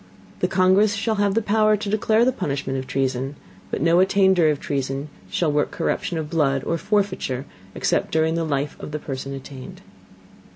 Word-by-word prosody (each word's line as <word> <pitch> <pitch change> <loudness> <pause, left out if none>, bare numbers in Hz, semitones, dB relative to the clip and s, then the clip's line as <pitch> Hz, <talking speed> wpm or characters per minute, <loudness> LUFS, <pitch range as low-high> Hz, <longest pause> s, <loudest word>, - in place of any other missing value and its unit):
The - - +1
Congress 195 +3 +3
shall 220 +2 -1
have 200 -1 +2
power 215 0 +3
to 205 0 -5
declare 215 +2 +2
the 255 - +3
punishment 140 - -3
of 130 - -7
Treason, 135 +1 -1 0.3
but - - -2
no 170 +1 +4
Attainder 190 -3 +4
of 150 -2 0
Treason 135 +1 -3 0.2
shall 150 - 0
work 145 0 +1
Corruption 170 - -2
of 155 -1 -3
Blood, 140 -4 +1
or 165 - -1
Forfeiture 185 - -1 0.3
except - - 0
during 160 0 +2
the 165 0 0
Life 145 -2 -1
of 150 - -8
the - - -1
Person 135 -1 -5
attainted. 135 -1 -10
160 Hz, 175 wpm, -23 LUFS, 135-200 Hz, 0.3 s, no